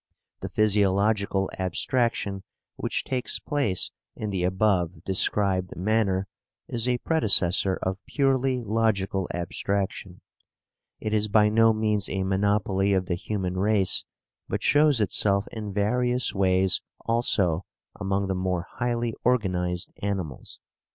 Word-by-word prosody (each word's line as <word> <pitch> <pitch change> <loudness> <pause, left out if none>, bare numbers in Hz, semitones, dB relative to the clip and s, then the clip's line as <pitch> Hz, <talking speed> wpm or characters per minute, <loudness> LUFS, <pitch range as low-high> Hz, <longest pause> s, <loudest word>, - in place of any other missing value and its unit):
The - - -5
physiological 100 -1 +1
abstraction 100 +1 -1 0.3
which - - -2
takes 130 -1 -2
place 140 -11 0 0.2
in 105 -2 -4
the 95 -2 -1
above 95 -2 +1
described 95 -1 +1
manner 95 -1 0 0.4
is 120 0 -2
a 125 - +2
predecessor 100 - +2
of 95 +1 -3
purely 135 -2 +1
logical 100 -4 0
abstraction. 95 +1 -3 0.8
It 110 - -3
is 105 0 +2
by 105 0 +4
no 115 +1 +5
means 110 -2 0
a 95 0 -1
monopoly 100 0 +1
of 95 -1 +1
the 90 - -2
human 95 0 -3
race, 100 -1 +3 0.5
but - - -2
shows 145 -4 +4
itself 100 0 +2
in 105 -2 -5
various 125 +5 +1
ways 95 -1 +2 0.2
also 100 -7 +1 0.3
among 100 -1 0
the 95 - -1
more 90 -2 -1
highly 120 -1 -1
organized 90 -7 0
animals." 95 -8 -4
100 Hz, 120 wpm, -26 LUFS, 95-110 Hz, 0.8 s, no